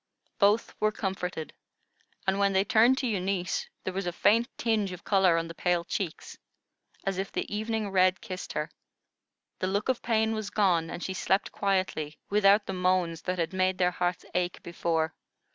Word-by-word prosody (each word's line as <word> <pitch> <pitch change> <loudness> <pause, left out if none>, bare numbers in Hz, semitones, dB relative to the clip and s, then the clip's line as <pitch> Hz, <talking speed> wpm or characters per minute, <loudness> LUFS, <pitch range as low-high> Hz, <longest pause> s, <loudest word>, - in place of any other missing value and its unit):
Both 205 +2 +3
were 215 0 +2
comforted, 185 -6 -4 0.7
and 190 +1 +1
when 200 -1 +3
they 190 0 +4
turned 225 +5 +4
to 260 - -1
Eunice 190 -3 -1 0.2
there 185 - -3
was 190 -1 -3
a - - 0
faint 225 +7 +3
tinge 215 -4 0
of 180 - -10
color 190 -4 +4
on 165 0 -1
the 165 - -7
pale 175 0 +1
cheeks, 175 -3 -4 0.7
as 195 -1 -1
if 195 - -3
the - - -3
evening 220 0 -1
red 185 -1 +4
kissed 185 0 -6
her; 150 +1 -3 0.9
the 185 - 0
look 200 +5 -1
of 255 - +1
pain 220 -1 +1
was 215 -2 -3
gone, 180 -6 +2
and 175 - -6
she 190 - -3
slept 190 +1 0
quietly, 185 -6 -1
without 205 0 +5
the 195 - -4
moans 180 -3 +1
that 185 0 -2
had 170 +1 -1
made 185 0 +1
their 180 -1 +3
hearts 180 0 -2
ache 180 0 -1
before. 165 -2 -1
190 Hz, 180 wpm, -28 LUFS, 180-205 Hz, 0.9 s, without